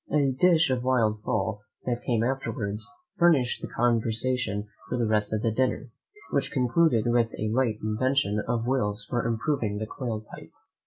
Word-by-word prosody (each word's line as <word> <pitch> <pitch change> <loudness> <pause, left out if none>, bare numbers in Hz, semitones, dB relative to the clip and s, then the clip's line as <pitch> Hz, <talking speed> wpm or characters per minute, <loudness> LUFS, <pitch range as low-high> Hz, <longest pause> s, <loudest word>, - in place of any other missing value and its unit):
A 140 -2 +3
dish 160 +2 +4
of 125 -1 0
wild 115 -5 +1
fowl 105 -2 -1 0.2
that 120 -1 -1
came 115 -2 0
afterwards 110 -5 -2 0.3
furnished 130 -11 +3
conversation 115 -2 +1 0.2
for - - -1
the 120 - +1
rest 105 -1 +1
of 110 -1 -1
the 115 - +2
dinner, 130 +2 -1 0.4
which 140 0 0
concluded 125 -1 +3
with 120 -1 +3
a 110 - -1
late 120 -4 +1
invention 110 0 +1
of 115 -1 0
Will's 105 -5 0
for 120 +2 -1
improving 115 -2 -1
the 110 - -3
quail 110 -2 -5
pipe. - - -10
120 Hz, 160 wpm, -27 LUFS, 110-130 Hz, 0.4 s, dish